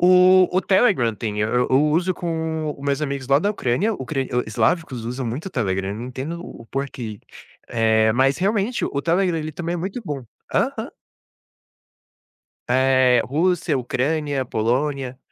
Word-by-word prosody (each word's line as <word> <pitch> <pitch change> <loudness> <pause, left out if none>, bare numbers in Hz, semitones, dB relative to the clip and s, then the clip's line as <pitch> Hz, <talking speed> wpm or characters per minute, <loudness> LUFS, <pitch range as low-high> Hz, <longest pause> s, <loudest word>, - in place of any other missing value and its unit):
O 185 +1 +6
o 185 - +3
Telegram 190 - +3
tem, 105 +1 -4
e - - 0
eu 125 +4 +1
uso 155 +7 +3
com 160 -2 -2
os 140 - -9
meus 140 0 0
amigos 140 -2 -3
lá 140 +1 +5
da 200 +6 +1
Ucrânia, 205 - 0
ucra 135 -1 -3 0.3
islavicos, 130 - 0
usam 125 +1 -4
muito 130 +11 -4
o - - -4
Telegram, 95 - -1
não 115 +3 -6
entendo 135 +7 -5
o 115 - -11
porquê, 125 -6 -5 0.5
eh, 110 -1 +3
mas 135 +3 +3
realmente 205 +5 0
o 140 - -2
Telegram 175 0 +1
ele 155 0 -4
também 170 +2 -4
é - - -1
muito 195 +8 -4
bom. 145 -5 -4 0.3
Aham. - - 0 1.8
Eh, 130 -1 +4
Rússia, 160 +1 +1
Ucrânia, 140 +2 -1
Polônia. 130 +3 -1
140 Hz, 155 wpm, -22 LUFS, 125-170 Hz, 1.8 s, O